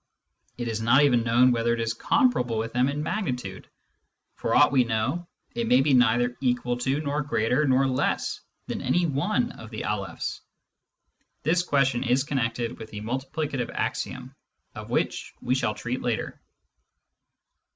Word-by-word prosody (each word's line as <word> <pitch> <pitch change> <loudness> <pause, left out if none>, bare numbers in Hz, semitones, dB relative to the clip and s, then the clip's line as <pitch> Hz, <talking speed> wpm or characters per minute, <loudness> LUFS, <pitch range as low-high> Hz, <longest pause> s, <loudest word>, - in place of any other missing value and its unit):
It 120 -1 -3
is 110 -1 -2
not 120 +5 +5
even 125 -5 +4
known 120 +2 +4
whether 120 0 +1
it - - -6
is 115 0 -1
comparable 125 - +1
with 115 +1 -3
them 125 +2 +2
in 145 +1 -2
magnitude; 125 - -4 0.6
for - - -1
aught - - +6
we 130 -2 +4
know, 120 +10 -1 0.3
it 235 -1 -2
may 130 - +5
be 140 0 +2
neither 125 0 +3
equal 125 -1 0
to 135 +3 0
nor 145 0 -1
greater 125 +2 +1
nor 135 +1 +4
less 130 -1 0 0.3
than - - -4
any 175 0 +2
one 205 - 0
of 110 - -11
the 110 -2 -5
Alephs. 100 -2 -3 1.0
This 170 +4 +3
question 135 -7 +1
is 125 +1 +2
connected 120 -4 -2
with 110 - -8
the 105 - -7
multiplicative 130 +2 -3
axiom, - - -3 0.4
of - - -9
which - - -2
we - - 0
shall 120 -5 0
treat 120 +4 -4
later. 120 -2 -3
125 Hz, 160 wpm, -26 LUFS, 115-140 Hz, 1.0 s, aught